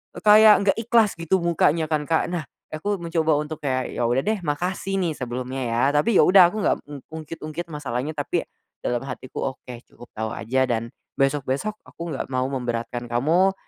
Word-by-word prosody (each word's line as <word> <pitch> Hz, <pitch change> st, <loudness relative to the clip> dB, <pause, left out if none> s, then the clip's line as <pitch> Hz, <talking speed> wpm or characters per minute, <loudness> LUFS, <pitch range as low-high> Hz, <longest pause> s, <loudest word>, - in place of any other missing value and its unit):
eee, -, -, -8 dB
kayak 215 Hz, 0 st, +8 dB, 0.2 s
gak 200 Hz, -, -7 dB
ikhlas 225 Hz, -2 st, +3 dB
gitu 165 Hz, +3 st, +1 dB
mukanya 165 Hz, -1 st, +2 dB
kan 150 Hz, -1 st, +1 dB
Kak, 160 Hz, -1 st, +1 dB
nah, 170 Hz, -4 st, -3 dB, 0.3 s
aku 200 Hz, +6 st, -2 dB
mencoba 165 Hz, -3 st, +1 dB
untuk 150 Hz, +1 st, -4 dB
kayak, 130 Hz, -3 st, -2 dB
ya -, -, -3 dB
udah 130 Hz, +5 st, +1 dB
deh 215 Hz, 0 st, 0 dB
makasih 180 Hz, +5 st, -2 dB
nih 170 Hz, -4 st, 0 dB
sebelumnya 125 Hz, +1 st, -4 dB
ya 115 Hz, -1 st, 0 dB
tapi 195 Hz, +8 st, +3 dB
ya -, -, +6 dB
udah 185 Hz, -2 st, +7 dB
aku 215 Hz, -, -7 dB
nggak -, -, +3 dB
m 145 Hz, -2 st, -7 dB
ungkit-ungkit 160 Hz, +1 st, -6 dB
masalahnya 145 Hz, -2 st, -3 dB
tapi, 145 Hz, -, -1 dB, 0.4 s
dalam 120 Hz, 0 st, -1 dB
hatiku 130 Hz, 0 st, -4 dB
oke, 125 Hz, -, -11 dB
cukup 120 Hz, -, -15 dB
tau 110 Hz, 0 st, -2 dB
aja 130 Hz, +4 st, 0 dB
dan, 115 Hz, -1 st, -1 dB, 0.3 s
besok-besok 140 Hz, +9 st, 0 dB
aku 170 Hz, -1 st, -7 dB
gak -, -, -3 dB
mau 130 Hz, 0 st, +1 dB
memberatkan 120 Hz, -2 st, -3 dB
kamu, 160 Hz, +11 st, +2 dB
150 Hz, 185 wpm, -23 LUFS, 130-175 Hz, 0.4 s, kayak